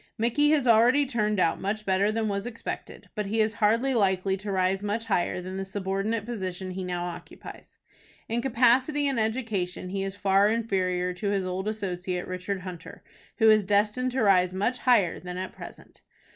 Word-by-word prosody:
Micky 240 Hz, +6 st, +2 dB
has 300 Hz, -4 st, +3 dB
already 245 Hz, +5 st, +5 dB
turned 215 Hz, -5 st, 0 dB
out 165 Hz, -, +1 dB
much 210 Hz, +2 st, -3 dB
better 195 Hz, +2 st, +2 dB
than 220 Hz, 0 st, -1 dB
was 200 Hz, +2 st, -2 dB
expected, 230 Hz, -1 st, -7 dB
but 210 Hz, -2 st, -3 dB
he 220 Hz, +3 st, -1 dB
is 215 Hz, 0 st, +2 dB
hardly 230 Hz, +6 st, +3 dB
likely 190 Hz, -3 st, +1 dB
to 200 Hz, +1 st, -5 dB
rise 190 Hz, 0 st, +1 dB
much 210 Hz, +2 st, -2 dB
higher 185 Hz, -4 st, 0 dB
than 185 Hz, +1 st, -6 dB
the 195 Hz, -, -2 dB
subordinate 195 Hz, +3 st, -2 dB
position 190 Hz, -5 st, -4 dB
he 185 Hz, +1 st, -5 dB
now 175 Hz, -1 st, -3 dB
occupies. 175 Hz, -1 st, -10 dB, 0.5 s
In 235 Hz, +1 st, -1 dB
capacity 260 Hz, +4 st, +3 dB
and 270 Hz, -4 st, 0 dB
education 220 Hz, -6 st, -2 dB
he 195 Hz, +1 st, -3 dB
is 195 Hz, 0 st, -3 dB
far 200 Hz, 0 st, +3 dB
inferior 185 Hz, -5 st, 0 dB
to 190 Hz, +3 st, -3 dB
his 195 Hz, -2 st, 0 dB
old 185 Hz, +2 st, -3 dB
associate, 180 Hz, -4 st, -3 dB
Richard 185 Hz, +1 st, -4 dB
Hunter, 180 Hz, -3 st, -9 dB, 0.3 s
who 225 Hz, -, +4 dB
is 215 Hz, -1 st, +4 dB
destined 210 Hz, +6 st, +1 dB
to 260 Hz, -3 st, +1 dB
rise 185 Hz, -2 st, +3 dB
much 230 Hz, +6 st, 0 dB
higher 220 Hz, -9 st, +3 dB
than 180 Hz, 0 st, -7 dB
at 185 Hz, 0 st, -4 dB
present. -, -, -12 dB
200 Hz, 185 wpm, -27 LUFS, 185-225 Hz, 0.5 s, already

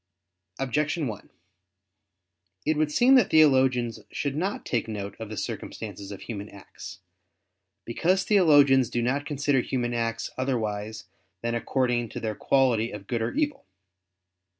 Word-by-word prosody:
Objection 150 Hz, +4 st, -1 dB
1: 110 Hz, -5 st, -6 dB, 1.4 s
It 155 Hz, -, +2 dB
would 150 Hz, 0 st, 0 dB
seem 245 Hz, -, +5 dB
that 250 Hz, -7 st, +5 dB
theologians 130 Hz, -6 st, +4 dB
should 140 Hz, -1 st, -3 dB
not 190 Hz, +6 st, -2 dB
take 115 Hz, -2 st, -1 dB
note 100 Hz, -2 st, -5 dB
of 110 Hz, -2 st, -6 dB
the 110 Hz, -, -6 dB
circumstances 100 Hz, -2 st, -6 dB
of 100 Hz, -, -8 dB
human 105 Hz, -2 st, -6 dB
acts. 100 Hz, -1 st, -11 dB, 0.8 s
Because 180 Hz, +11 st, +1 dB
theologians 145 Hz, -, +5 dB
do 120 Hz, -, -1 dB
not 140 Hz, +4 st, -1 dB
consider 145 Hz, -2 st, +1 dB
human 120 Hz, -1 st, -2 dB
acts 115 Hz, -1 st, -2 dB
otherwise 110 Hz, -4 st, -2 dB, 0.4 s
than 120 Hz, 0 st, -1 dB
according 120 Hz, -1 st, 0 dB
to -, -, -6 dB
their 110 Hz, -1 st, -2 dB
quality 120 Hz, -1 st, +2 dB
of 105 Hz, -1 st, -8 dB
good 115 Hz, +1 st, -2 dB
or 110 Hz, -, -1 dB
evil. 295 Hz, -, -1 dB
125 Hz, 140 wpm, -26 LUFS, 110-145 Hz, 1.4 s, seem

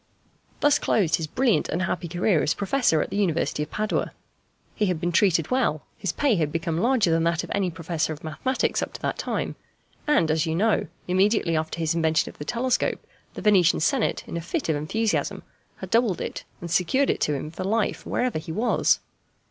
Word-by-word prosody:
Thus 290 Hz, -1 st, +4 dB
closed 180 Hz, -8 st, +2 dB
his 160 Hz, -3 st, -4 dB
brilliant 245 Hz, -, +1 dB
and 180 Hz, -, -1 dB
happy 185 Hz, -1 st, -2 dB
career 175 Hz, 0 st, +1 dB
as -, -, +1 dB
a -, -, -18 dB
professor 200 Hz, -, +2 dB
at -, -, -8 dB
the -, -, -2 dB
University 170 Hz, -6 st, 0 dB
of 150 Hz, -, -3 dB
Padua. 215 Hz, 0 st, -2 dB, 0.6 s
He 210 Hz, -, 0 dB
had 180 Hz, -3 st, -1 dB
been 175 Hz, +1 st, -1 dB
treated 170 Hz, -2 st, +2 dB
well: 240 Hz, -, +1 dB
his 195 Hz, -, -2 dB
pay 270 Hz, -, +1 dB
had 155 Hz, -3 st, 0 dB
become 165 Hz, 0 st, -2 dB
larger 230 Hz, -4 st, +3 dB
than 165 Hz, 0 st, +2 dB
that 170 Hz, 0 st, +1 dB
of -, -, -8 dB
any 195 Hz, -2 st, +1 dB
Professor 165 Hz, -1 st, -2 dB
of 155 Hz, 0 st, -7 dB
Mathematics 205 Hz, +12 st, -1 dB
up -, -, -4 dB
to -, -, -9 dB
that -, -, -2 dB
time; -, -, -2 dB, 0.5 s
and, 285 Hz, -, +3 dB
as 160 Hz, +1 st, +1 dB
you 160 Hz, -, -1 dB
know, 215 Hz, +5 st, +2 dB, 0.2 s
immediately 185 Hz, -1 st, +2 dB
after 160 Hz, +1 st, -2 dB
his 165 Hz, -1 st, 0 dB
invention 160 Hz, -1 st, +1 dB
of -, -, -25 dB
the 150 Hz, -, -5 dB
telescope 245 Hz, +4 st, 0 dB, 0.3 s
the -, -, -7 dB
Venetian 190 Hz, -5 st, +4 dB
Senate, 235 Hz, -, +1 dB
in -, -, -4 dB
a -, -, -3 dB
fit 220 Hz, -, -3 dB
of 160 Hz, -, +2 dB
enthusiasm, 215 Hz, +10 st, -1 dB, 0.3 s
had -, -, -9 dB
doubled 230 Hz, -5 st, +2 dB
it -, -, -5 dB, 0.2 s
and 170 Hz, -1 st, -6 dB
secured 185 Hz, +11 st, +2 dB
it -, -, -4 dB
to 150 Hz, -, +1 dB
him 150 Hz, +3 st, -5 dB
for 185 Hz, -, -5 dB
life 210 Hz, +2 st, 0 dB
wherever 245 Hz, -9 st, -1 dB
he 160 Hz, -, -7 dB
was. 220 Hz, +8 st, +2 dB
175 Hz, 210 wpm, -25 LUFS, 160-220 Hz, 0.6 s, Thus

